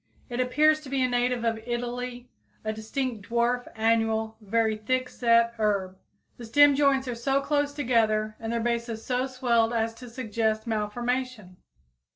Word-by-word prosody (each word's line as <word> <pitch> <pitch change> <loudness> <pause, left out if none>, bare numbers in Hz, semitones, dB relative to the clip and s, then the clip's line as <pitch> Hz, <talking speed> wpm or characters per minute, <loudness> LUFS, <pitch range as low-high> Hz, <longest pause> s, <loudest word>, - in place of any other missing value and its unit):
It 240 0 -4
appears 305 +5 +3
to 285 - -10
be 270 -1 +1
a - - +3
native 245 -1 0
of 225 -1 0
Italy, 245 +1 -4 0.4
a 215 - -1
distinct 220 -1 -4
dwarf 240 +1 +1
annual, 225 0 +1
very 220 +1 +1
thick 255 +4 -1
set 235 -1 +3
herb. 200 -3 0 0.4
The 240 - -9
stem 290 +5 +6
joints 275 -1 +2
are 245 - -2
so 270 +4 0
close 290 0 0
together 225 -6 +1
and 225 0 -4
their 235 - 0
bases 235 -1 -2
so 255 +1 0
swelled 240 -3 +1
as 225 0 0
to 245 +1 -11
suggest 220 -2 -1
malformation. 230 -2 -3
235 Hz, 160 wpm, -27 LUFS, 220-255 Hz, 0.4 s, stem